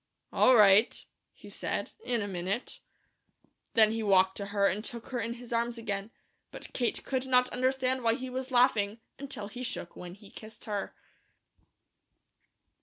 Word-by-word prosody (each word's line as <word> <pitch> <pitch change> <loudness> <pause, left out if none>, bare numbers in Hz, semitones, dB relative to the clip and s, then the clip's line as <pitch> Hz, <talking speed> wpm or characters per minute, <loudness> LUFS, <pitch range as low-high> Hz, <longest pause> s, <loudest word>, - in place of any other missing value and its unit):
"All 255 - +6
right," 210 0 +5 0.3
he - - -16
said. - - -4
"In 235 -3 -1
a - - -4
minute." 190 +5 -3 1.0
Then 220 -2 +6
he 225 0 -2
walked 190 -2 +4
to 200 - -4
her 200 0 +1
and 205 +2 +1
took 235 0 -6
her 250 - -2
in 230 +1 -3
his 245 0 -9
arms 235 +1 0
again, 205 -2 -4 0.4
but - - -9
Kate 240 -2 -1
could 265 -1 -2
not 250 -1 +4
understand 260 0 0
why 230 -1 +2
he 260 0 -6
was 255 +1 -4
laughing 230 -4 +3 0.2
until 265 -7 -5
he 245 +4 -9
shook 245 -8 -4
when 180 0 -9
he 205 0 -16
kissed 220 0 -11
her. 205 -2 -4
230 Hz, 165 wpm, -30 LUFS, 205-250 Hz, 1.0 s, All